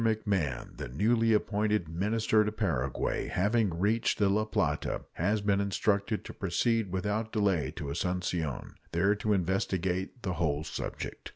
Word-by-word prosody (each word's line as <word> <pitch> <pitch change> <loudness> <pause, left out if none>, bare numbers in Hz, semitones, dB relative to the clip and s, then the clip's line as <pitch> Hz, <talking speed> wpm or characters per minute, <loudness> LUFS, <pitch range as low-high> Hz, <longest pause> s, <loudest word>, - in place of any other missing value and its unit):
McMahon, 100 - -1
the - - -5
newly 115 - +2
appointed 105 -3 +1
minister 105 +6 +2
to 105 - -1
Paraguay, 80 - -1
having 105 +3 +2
reached 110 +5 +1
the 100 -2 +3
La 105 +2 +2
Plata, 110 - -1
has 100 +5 +1
been 100 -1 +2
instructed 100 +1 0
to - - -7
proceed 100 +2 0
without 105 +4 -1
delay 95 - +1
to 75 -5 -4
Asuncion, 85 -3 -2 0.2
there 95 +5 +3
to 105 +1 -1
investigate 95 +3 -1
the 90 - -1
whole 75 -3 0
subject. 80 - -5
100 Hz, 145 wpm, -30 LUFS, 85-110 Hz, 0.2 s, the